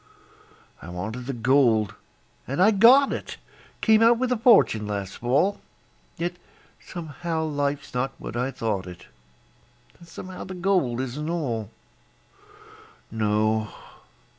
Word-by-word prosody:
I 85 - -9
wanted 110 +8 -6
the 135 - -2
gold, 115 -4 +2 0.5
and 140 +6 -3
I 200 +4 +6
got 245 +7 +6
it - - -6 0.4
Came 220 -1 +4
out 230 +1 +6
with 255 +1 -1
a - - +3
fortune 220 - +4
last 100 -2 -4
fall, 145 - +1 0.6
Yet 175 +1 -3 0.5
somehow 165 -1 -4
life's 145 -2 -2
not 125 +2 -1
what - - -8
I 125 +2 -1
thought 110 -8 -3
it, 90 -1 -11 0.9
And 170 - -15
somehow 185 +2 -8
the 185 - -7
gold 175 -10 0
isn't 140 +5 -4
all. 120 - -2 1.4
No! 110 0 0
135 Hz, 125 wpm, -25 LUFS, 110-175 Hz, 1.4 s, I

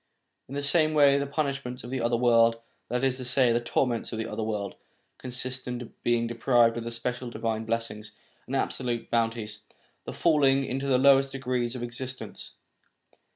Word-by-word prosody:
In 135 - -6
the 145 - -2
same 155 +1 +2
way 140 -1 +6
the 140 - -2
punishments 140 -3 -3
of 120 - -8
the 130 -2 -2
other 120 +1 +1
world, 115 -1 +4 0.3
that 125 +2 -1
is 130 -1 +2
to 130 - -6
say, 125 -1 +3
the 115 - +2
torments 120 0 0
of 115 - -4
the 110 - -2
other 105 +1 -4
world, 105 -2 -3 0.5
consist 130 0 -5
in 125 -1 -5
being 120 -1 +1
deprived 120 0 +3
of 120 - -4
the - - -3
special 120 +1 -4
divine 110 -1 -3
blessings 110 -2 -3 0.4
and 135 - -3
the - - +3
absolute 120 -3 -2
bounties, 115 -2 -1 0.5
and - - -5
fall 155 -4 +3
ing 135 0 +4
into 135 +1 -3
the 130 -2 +4
lowest 135 0 +5
degrees 125 -2 -2
of 125 - -5
existence. 125 +2 -6
125 Hz, 190 wpm, -27 LUFS, 115-135 Hz, 0.5 s, way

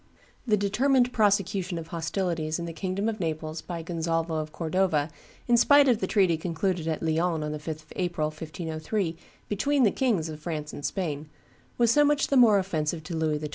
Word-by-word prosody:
] - - -32
The 210 -2 +3
determined 245 +5 +2
prosecution 195 -4 +1
of 165 -1 -7
hostilities 165 -1 -2
in 170 - -4
the 165 - -6
kingdom 190 +5 -2
of 220 -1 -2
Naples 155 -1 -3
by 170 -2 -6
Gonzalvo 165 -1 -1
of 155 0 -5
Cordova, 160 -2 0 0.4
in 240 -1 +5
spite 285 +4 +6
of 240 -4 +3
the - - -1
treaty 185 -6 +3
concluded 170 +1 -2
at 160 0 -2
Lyons 160 0 0
on 150 - -3
the 150 - -4
5th 155 0 -6
of 155 - -15
April, 175 -4 -1
1503, 160 +3 -4 0.3
between 275 +7 +1
the 210 - +5
Kings 220 - 0
of 155 -1 -7
France 155 -2 -5
and 145 - -8
Spain, 155 -5 -3 0.5
was 235 -1 +4
so 295 +4 +5
much 295 0 +2
the 280 - +2
more 235 -5 +7
offensive 160 -4 -1
to 170 +1 -5
Louis 160 -1 0
XII. 150 0 -5
170 Hz, 200 wpm, -27 LUFS, 155-205 Hz, 0.5 s, more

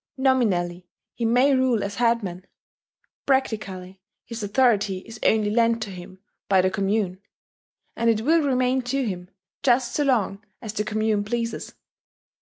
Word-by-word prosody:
Nominally 185 -10 +1 0.3
he 235 - -3
may 250 +5 +4
rule 255 -5 +2
as 200 0 -5
headman: 220 -7 0 0.8
practically 195 -8 -1 0.2
his 230 -1 -7
authority 205 -3 +1
is 225 -1 -10
only 215 -1 +2
lent 230 +1 +2
to 205 - -7
him 185 0 -10 0.3
by 190 -1 +5
the 185 0 +1
commune, 195 -1 -1 0.7
and 230 - +1
it 220 -1 +2
will 320 +7 +3
remain 260 -2 +1
to 260 +2 -1
him 180 -4 -5 0.3
just 245 -2 +2
so 295 - +1
long 220 -7 0 0.2
as 220 -3 -6
the 210 -1 -1
commune 215 -1 0
pleases. 230 +2 -4
220 Hz, 145 wpm, -24 LUFS, 195-245 Hz, 0.8 s, by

